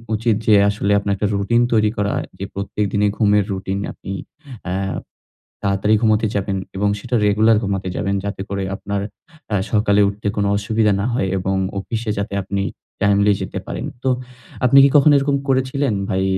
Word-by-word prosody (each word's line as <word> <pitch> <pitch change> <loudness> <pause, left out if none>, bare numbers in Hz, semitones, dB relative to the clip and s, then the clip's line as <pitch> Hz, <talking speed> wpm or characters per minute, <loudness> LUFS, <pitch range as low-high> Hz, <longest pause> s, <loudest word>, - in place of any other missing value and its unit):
উচিত 110 0 +1
যে 110 - +6 0.2
আসলে 105 0 -1
আপনার 100 0 -1
১ - - -13
টা 105 - +2
রুটিন 110 +4 +2
তৈরি 110 -1 +3
করা। 100 0 0 0.3
যে 100 - -3
প্রত্যেক 100 +1 -2
দিনে 105 0 +2
ঘুমের 105 -2 +3
রুটিন 95 0 -3
আপনি 95 - -9 0.5
অ্যা 90 - -2 0.9
তাড়াতাড়ি 100 +2 +2
ঘুমাতে 110 -1 +3
যাবেন 100 -1 -1 0.2
এবং 100 +1 +1
সেটা 125 +3 -5
রেগুলার 110 +2 +4
ঘুমাতে 100 -2 -2
যাবেন 100 -1 -1
যাতে 100 -1 -4
করে 100 -1 -2
আপনার 100 0 -3 0.5
অ্যা 105 - 0 0.2
সকালে 105 -1 +3
উঠতে 100 +1 -6
কোন 100 - +1
অসুবিধা 105 0 +1
না 100 - -1
হয় 95 -6 0
এবং 95 +1 -1 0.2
অফিসে 110 +3 -3
যাতে 100 0 -3
আপনি 100 +1 -2 0.4
টাইমলি 100 0 +4
যেতে - - -4
পারেন। - - -4 0.2
তো 135 - 0 0.6
আপনি 125 +2 +6
কি - - +6
কখনো 145 +1 +6
এরকম 140 0 +1
করেছিলেন 130 -1 +1
ভাই? 95 -2 0
105 Hz, 175 wpm, -20 LUFS, 100-110 Hz, 0.9 s, যে